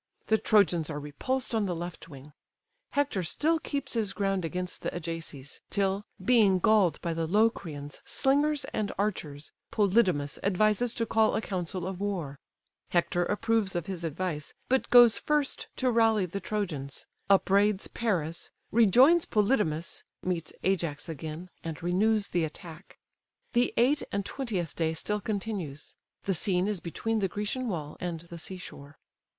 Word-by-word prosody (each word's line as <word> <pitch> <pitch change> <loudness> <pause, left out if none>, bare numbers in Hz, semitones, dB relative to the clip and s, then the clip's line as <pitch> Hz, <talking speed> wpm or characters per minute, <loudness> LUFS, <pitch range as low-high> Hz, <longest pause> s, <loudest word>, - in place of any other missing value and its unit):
The 220 0 +4
Trojans 180 -7 +3
are 150 -2 -3
repulsed 235 - -3
on 220 -3 +1
the 180 - -1
left 170 0 -7
wing; 140 0 -12 0.6
Hector 285 -9 +1
still 310 - +1
keeps 285 -3 -4
his 215 -4 -1
ground 195 -1 0
against 180 +2 -3
the - - -1
Ajaces, 165 -5 -6
till, 195 0 0 0.2
being 215 -6 +5
galled 185 -4 +3
by 170 -2 -1
the 165 0 -2
Locrian 170 -8 0
slingers 290 +2 +1
and 210 -2 -1
archers, 155 -8 -3 0.2
Polydamas 190 -9 +2
advises 215 +4 +2
to 230 - 0
call 220 0 +3
a - - +2
council 180 -3 -3
of 190 0 -5
war: 170 -9 -3 0.5
Hector 175 0 +1
approves 210 0 0
of 175 -2 -1
his 185 -3 -5
advice, 160 -2 -3
but 265 +1 +2
goes 240 -2 +8
first 300 -2 0
to 255 -1 +1
rally 225 -4 +3
the 180 +3 -4
Trojans; 170 -11 -4 0.2
upbraids 200 +1 +3
Paris, 175 -8 -2 0.2
rejoins 250 - +6
Polydamas, 205 -8 +1 0.2
meets 175 -4 -2
Ajax 170 -4 -1
again, 160 +3 -6 0.2
and 165 -1 -6
renews 200 +4 +2
the 175 - +1
attack. 160 +2 -8 0.6
The 240 +1 +3
eight 275 +5 +4
and 200 -1 -1
twentieth 200 - -3
day 160 -1 0
still 210 +6 -2
continues. 195 -9 -4 0.3
The 195 - 0
scene 180 +2 +1
is 210 -3 -1
between 220 +7 -2
the 195 - +1
Grecian 210 +7 -3
wall 155 -8 -4
and 170 -3 -4
the 170 0 -10
sea 185 +3 -4
shore. 145 -4 -11
190 Hz, 150 wpm, -29 LUFS, 165-220 Hz, 0.6 s, goes